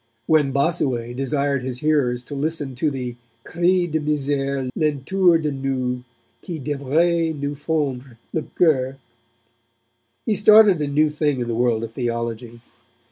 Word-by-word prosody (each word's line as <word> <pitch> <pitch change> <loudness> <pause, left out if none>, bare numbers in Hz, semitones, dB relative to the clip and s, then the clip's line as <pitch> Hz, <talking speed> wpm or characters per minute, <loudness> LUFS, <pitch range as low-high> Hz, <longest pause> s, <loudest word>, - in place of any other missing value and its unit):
When 150 -2 +3
Bossuet 130 -5 0
desired 140 0 -1
his 125 -1 -4
hearers 135 -5 +1
to 145 - -9
listen 145 -1 -2
to 140 +5 0
the 125 -3 -5 0.3
cri 175 +2 +1
de 160 -2 -1
misere 140 -2 -1
l'entour 165 +4 +2
de 155 -2 -2
nous, 130 -2 -2 0.4
qui 170 -3 -6
devrait 155 +3 0
nous 145 +1 -2
fondre 140 -5 -3 0.2
le 160 - 0
coeur, 135 -6 +2 1.3
he 220 - +1
started 210 -3 +6
a 145 - 0
new 150 +2 +2
thing 150 -3 0
in 120 - -2
the 120 - -2
world 115 -1 +1
of 115 -1 -6
theology. 115 -1 -4
140 Hz, 140 wpm, -22 LUFS, 125-155 Hz, 1.3 s, started